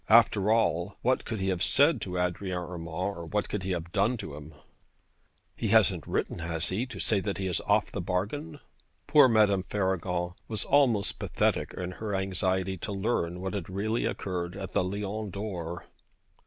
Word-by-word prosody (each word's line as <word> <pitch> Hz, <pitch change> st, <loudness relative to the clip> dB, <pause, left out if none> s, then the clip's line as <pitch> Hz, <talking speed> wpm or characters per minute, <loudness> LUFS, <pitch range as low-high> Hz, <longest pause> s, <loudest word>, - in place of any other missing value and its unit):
After 110 Hz, -2 st, +5 dB
all, 100 Hz, -4 st, +2 dB
what 130 Hz, +1 st, +2 dB
could 110 Hz, -, -3 dB
he 95 Hz, 0 st, 0 dB
have 90 Hz, -2 st, -1 dB
said 140 Hz, -3 st, +4 dB
to 90 Hz, -2 st, -3 dB
Adrian 90 Hz, +1 st, -1 dB
Urmand? 90 Hz, -1 st, -5 dB, 0.3 s
or 85 Hz, -1 st, -7 dB
what 105 Hz, +2 st, -1 dB
could 105 Hz, -, -3 dB
he 95 Hz, -, -4 dB
have 85 Hz, -2 st, -3 dB
done 105 Hz, +5 st, +2 dB
to 80 Hz, -, -7 dB
him? 75 Hz, +1 st, -10 dB, 1.0 s
'He -, -, -2 dB
hasn't -, -, +4 dB
written, -, -, -1 dB
has 80 Hz, 0 st, -2 dB
he, 110 Hz, +8 st, -1 dB
to 115 Hz, -6 st, -8 dB
say 105 Hz, +1 st, +2 dB
that 100 Hz, +1 st, -2 dB
he 95 Hz, -, -3 dB
is 90 Hz, -2 st, -1 dB
off -, -, +2 dB
his -, -, -2 dB
bargain?' 110 Hz, -, -2 dB, 0.5 s
Poor 150 Hz, -4 st, +7 dB
Madame 105 Hz, -5 st, +4 dB
Faragon 90 Hz, -2 st, -1 dB
was 110 Hz, -2 st, -3 dB
almost 120 Hz, -8 st, +3 dB
pathetic -, -, 0 dB
in 90 Hz, 0 st, -3 dB
her 105 Hz, +1 st, -4 dB
anxiety 95 Hz, 0 st, 0 dB
to 95 Hz, -, -5 dB
learn 95 Hz, -4 st, -1 dB
what 95 Hz, +1 st, -3 dB
had 95 Hz, -4 st, -4 dB
really 110 Hz, +5 st, -1 dB
occurred 90 Hz, -2 st, -3 dB
at 95 Hz, -2 st, -6 dB
the -, -, +2 dB
Lion 100 Hz, +3 st, -3 dB
d'Or. 90 Hz, -4 st, -5 dB
95 Hz, 180 wpm, -29 LUFS, 90-105 Hz, 1.0 s, Poor